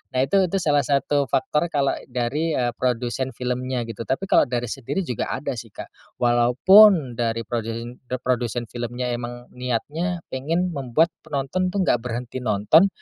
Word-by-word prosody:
Nah -, -, +2 dB
itu 135 Hz, -, 0 dB
itu 185 Hz, -, -3 dB
salah 150 Hz, -6 st, +2 dB
satu 140 Hz, 0 st, +1 dB
faktor 150 Hz, +6 st, 0 dB
kalau 140 Hz, -4 st, +1 dB, 0.2 s
dari, 135 Hz, +6 st, -1 dB
eee, 120 Hz, -1 st, 0 dB
produsen 125 Hz, +1 st, -1 dB
filmnya 125 Hz, 0 st, -2 dB
gitu, 115 Hz, 0 st, -6 dB
tapi 135 Hz, +9 st, -1 dB
kalau -, -, +5 dB
dari 120 Hz, -1 st, -2 dB
sendiri 135 Hz, +8 st, -3 dB
juga 125 Hz, -, -3 dB
ada -, -, -3 dB
sih -, -, -10 dB
Kak. -, -, -10 dB, 0.3 s
Walaupun 125 Hz, -, +5 dB
dari 115 Hz, -1 st, 0 dB
prodeen 115 Hz, +2 st, -5 dB
eee, 130 Hz, +1 st, -3 dB
produsen 120 Hz, -2 st, -1 dB
filmnya 120 Hz, +1 st, -3 dB
emang 120 Hz, 0 st, -6 dB
niatnya 150 Hz, +8 st, -3 dB
pengen 165 Hz, +7 st, -1 dB
membuat 140 Hz, +5 st, +1 dB
penonton 160 Hz, +5 st, -2 dB
tuh 195 Hz, 0 st, 0 dB
nggak 120 Hz, -, +2 dB
berhenti 125 Hz, +1 st, -4 dB
nonton, 110 Hz, -, +4 dB
125 Hz, 160 wpm, -23 LUFS, 120-150 Hz, 0.3 s, kalau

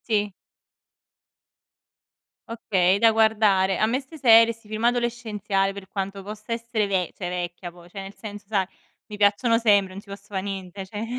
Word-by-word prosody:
Sì. 210 Hz, -3 st, -1 dB, 2.2 s
Okay, 190 Hz, -5 st, +1 dB
è -, -, -2 dB
da 225 Hz, +1 st, +5 dB
guardare. 210 Hz, -4 st, +3 dB
A 215 Hz, -, +3 dB
me 245 Hz, +4 st, 0 dB
'ste 285 Hz, +4 st, -13 dB
serie, 230 Hz, -3 st, +7 dB
'sti 230 Hz, -1 st, -20 dB
film 215 Hz, +1 st, -4 dB
adolescenziali, 225 Hz, -5 st, 0 dB
per 195 Hz, -1 st, -9 dB
quanto 195 Hz, 0 st, -4 dB
possa 210 Hz, +2 st, -7 dB
essere 230 Hz, -2 st, -1 dB
ve 185 Hz, -3 st, -1 dB
cioè, 180 Hz, -, -4 dB
vecchia, 175 Hz, 0 st, -5 dB
poi, 175 Hz, 0 st, -17 dB
cioè, 195 Hz, +3 st, -8 dB
nel 195 Hz, +1 st, -9 dB
senso 205 Hz, -2 st, -9 dB
sa 195 Hz, -4 st, 0 dB, 0.4 s
mi 210 Hz, -, -8 dB
piacciono 210 Hz, +3 st, +3 dB
sempre, 205 Hz, -5 st, +3 dB
non 195 Hz, -, -9 dB
ci 215 Hz, -, -25 dB
posso 200 Hz, +1 st, -10 dB
fa' -, -, 0 dB
niente, 195 Hz, -1 st, -6 dB
cioè. 210 Hz, +3 st, -5 dB
205 Hz, 175 wpm, -24 LUFS, 195-225 Hz, 2.2 s, serie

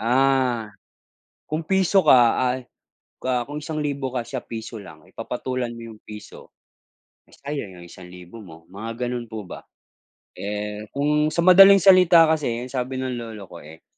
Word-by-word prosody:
Ah, 125 Hz, -3 st, +1 dB, 0.7 s
kung 155 Hz, +1 st, -3 dB
piso 190 Hz, +2 st, +2 dB
ka 120 Hz, -3 st, +5 dB
ay, 125 Hz, 0 st, -1 dB, 0.6 s
ah, 125 Hz, -1 st, 0 dB
kung 150 Hz, +1 st, -7 dB
1,000 145 Hz, -4 st, -3 dB
ka 125 Hz, -1 st, -2 dB
siya 130 Hz, 0 st, -6 dB
piso 115 Hz, 0 st, -8 dB
lang, 80 Hz, -4 st, -14 dB
eh -, -, -25 dB
papatulan 125 Hz, +1 st, -4 dB
mo 115 Hz, -, -11 dB
'yong 110 Hz, -, -16 dB
piso, 105 Hz, -1 st, -12 dB, 0.8 s
sayang 120 Hz, -11 st, -7 dB
yung 85 Hz, -, -12 dB
1,000 90 Hz, +4 st, -13 dB
mo 80 Hz, -3 st, -15 dB
mga 115 Hz, +5 st, -6 dB
ganun 120 Hz, -1 st, -5 dB
po 110 Hz, -3 st, -7 dB
ba. -, -, -10 dB, 0.8 s
Eh, 105 Hz, +1 st, -5 dB
kung 150 Hz, +2 st, +1 dB
sa 170 Hz, -, +1 dB
madaling 195 Hz, +2 st, +7 dB
salita 180 Hz, -3 st, +6 dB
kasi, 155 Hz, -2 st, 0 dB, 0.2 s
ang 125 Hz, -, -10 dB
sabi 130 Hz, 0 st, -3 dB
ng 130 Hz, -2 st, -4 dB
lolo 110 Hz, -4 st, -8 dB
ko 85 Hz, -, -10 dB
eh, 80 Hz, +2 st, -14 dB
125 Hz, 160 wpm, -22 LUFS, 105-145 Hz, 0.8 s, madaling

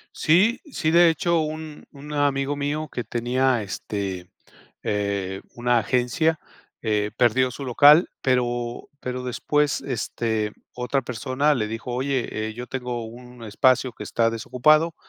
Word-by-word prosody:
Sí, 195 Hz, +10 st, +3 dB
sí, 155 Hz, -, 0 dB
de 170 Hz, 0 st, +7 dB
hecho, 170 Hz, +1 st, +1 dB
un 155 Hz, 0 st, -5 dB
un 145 Hz, +1 st, -10 dB
amigo 145 Hz, -1 st, 0 dB
mío 145 Hz, +2 st, -2 dB
que 120 Hz, -, -4 dB
tenía 120 Hz, +1 st, +1 dB
este, 95 Hz, -2 st, -5 dB, 0.5 s
eh, 100 Hz, -2 st, -2 dB
una 120 Hz, 0 st, +2 dB
agencia, 130 Hz, -, +1 dB, 0.4 s
eh, 105 Hz, -2 st, 0 dB
perdió 125 Hz, +1 st, +3 dB
su 140 Hz, -, -8 dB
local, 145 Hz, +6 st, +6 dB
pero 120 Hz, -2 st, -1 dB
pero 125 Hz, 0 st, -4 dB
después, 145 Hz, +3 st, 0 dB
este, 110 Hz, -3 st, -2 dB, 0.2 s
otra 125 Hz, +2 st, -1 dB
persona 130 Hz, +5 st, 0 dB
le 110 Hz, -4 st, -1 dB
dijo: 115 Hz, +3 st, -5 dB
"Oye, 125 Hz, -4 st, -2 dB
eh, -, -, -7 dB
yo 125 Hz, +2 st, -7 dB
tengo 125 Hz, -3 st, -4 dB
un 125 Hz, +2 st, -12 dB
espacio 130 Hz, +3 st, +2 dB
que -, -, -8 dB
está 115 Hz, -1 st, +1 dB
desocupado 140 Hz, +8 st, +2 dB
125 Hz, 140 wpm, -24 LUFS, 115-145 Hz, 0.5 s, de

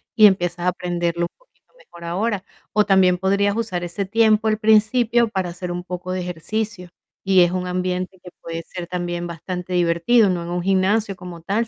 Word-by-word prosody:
y 215 Hz, -, +7 dB
empiezas 175 Hz, -3 st, +2 dB
a -, -, +4 dB
aprenderlo 175 Hz, -1 st, -2 dB
un -, -, -62 dB
poquito -, -, -35 dB
mejor 170 Hz, -, -15 dB
ahora. 195 Hz, +3 st, -1 dB, 0.3 s
O 210 Hz, -1 st, +3 dB
también 185 Hz, -2 st, +4 dB
podrías 200 Hz, +2 st, +1 dB
usar 215 Hz, -6 st, -2 dB
ese 175 Hz, +3 st, -3 dB
tiempo 220 Hz, +1 st, +3 dB
al 215 Hz, 0 st, +2 dB
principio 220 Hz, +2 st, +3 dB
para 190 Hz, -4 st, -2 dB
hacer 175 Hz, +1 st, -6 dB
un 175 Hz, 0 st, -4 dB
poco 180 Hz, 0 st, -6 dB
de 185 Hz, 0 st, -2 dB
ejercicio, 180 Hz, +2 st, -4 dB, 0.3 s
y 190 Hz, -1 st, +5 dB
es 175 Hz, -, +2 dB
un 180 Hz, 0 st, -2 dB
ambiente 180 Hz, +1 st, -2 dB
que 180 Hz, 0 st, -13 dB
que -, -, -60 dB
puede 165 Hz, 0 st, -5 dB
ser 175 Hz, 0 st, -7 dB
también 175 Hz, -1 st, -3 dB
bastante 180 Hz, +2 st, -6 dB
divertido, 175 Hz, +6 st, +3 dB
no 175 Hz, -2 st, -2 dB
en 170 Hz, -, -6 dB
un 175 Hz, 0 st, -2 dB
gimnasio 195 Hz, +2 st, +1 dB
como 180 Hz, -2 st, -10 dB
tal, 215 Hz, +6 st, 0 dB
185 Hz, 200 wpm, -21 LUFS, 175-210 Hz, 0.3 s, y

